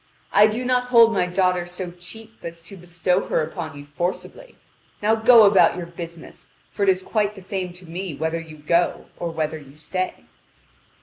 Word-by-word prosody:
I 210 +1 +7
do 230 +4 -3
not 250 0 +1
hold 230 -2 +6
my 185 -3 +1
daughter 180 -1 +1
so 180 0 -6
cheap 220 +6 -12
as 170 0 -8
to 185 +4 -12
bestow 180 +1 -1
her - - +1
upon 155 -1 -6
you 145 - -10
forcibly. 175 - -5 0.4
Now 215 +1 +2
go 225 +1 +7
about 200 -3 +5
your 175 - -4
business. 170 -1 -10 0.2
For - - -8
it 200 - +4
is 185 0 +2
quite 210 -1 -1
the 195 - -11
same 185 -2 -4
to 180 +1 -13
me 175 -1 -5
whether 160 +3 -2
you 160 -2 -11
go 170 +4 0
or 170 - -2
whether 160 -1 -3
you 140 0 -16
stay." 185 +4 -4
180 Hz, 190 wpm, -22 LUFS, 165-205 Hz, 0.4 s, I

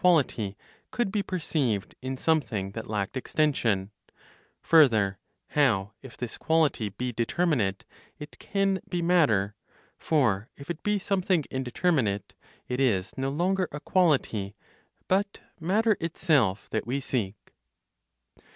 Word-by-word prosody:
quality 135 - +2 0.3
could 240 -5 -1
be 210 0 +1
perceived 150 - -1
in 130 +1 -4
something 115 -12 0
that 110 +1 -7
lacked 105 0 -2
extension; 120 -8 0 0.7
further, 110 - +4 0.3
how, 110 -8 +2
if 135 -3 -12
this 125 -2 -6
quality 160 -9 +2
be 125 +5 -4
determinate, 115 - 0 0.3
it 150 0 -10
can 195 -1 0
be 175 - -1
matter; 150 - +3 0.5
for 115 -9 +1
if 140 +4 -6
it 170 - -6
be 210 0 +1
something 185 -4 +1
indeterminate, 130 - 0 0.3
it 125 +1 -2
is 105 -8 +1
no 135 0 -1
longer 180 +5 +1
a 150 - -5
quality, 135 - +1 0.5
but 200 +2 0 0.2
matter 210 +6 +2
itself 145 - +1
that - - -2
we 130 +3 0
seek. 115 -7 -2
135 Hz, 125 wpm, -27 LUFS, 110-170 Hz, 0.7 s, further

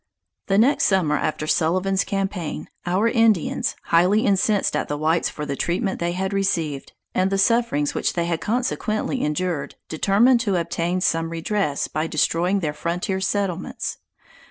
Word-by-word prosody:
The 195 - +2
next 245 +7 +4
summer 180 -7 +2
after 155 +1 -2
Sullivan's 185 +5 +1
campaign, 195 -5 -3 0.2
our 190 +6 +2
Indians, 225 -7 +2
highly 180 +6 +3
incensed 200 -2 +2
at 150 - -1
the 145 - -3
whites 160 +3 +1
for 150 - -6
the 140 -1 -3
treatment 190 - -1
they 170 0 -1
had 190 +2 -2
received, 165 -8 -1 0.2
and 185 +1 +2
the 195 - 0
sufferings 195 -8 +2
which - - -1
they 170 -1 -1
had 170 -1 -2
consequently 245 +1 -1
endured, 150 0 -2
determined 210 +10 +3
to 205 -5 0
obtain 170 +1 -1
some 165 -2 +1
redress 165 -2 -1
by 155 +1 -2
destroying 175 +5 +1
their 150 -3 -1
frontier 180 +4 -2
settlements. 190 -2 -2
185 Hz, 155 wpm, -22 LUFS, 165-200 Hz, 0.2 s, next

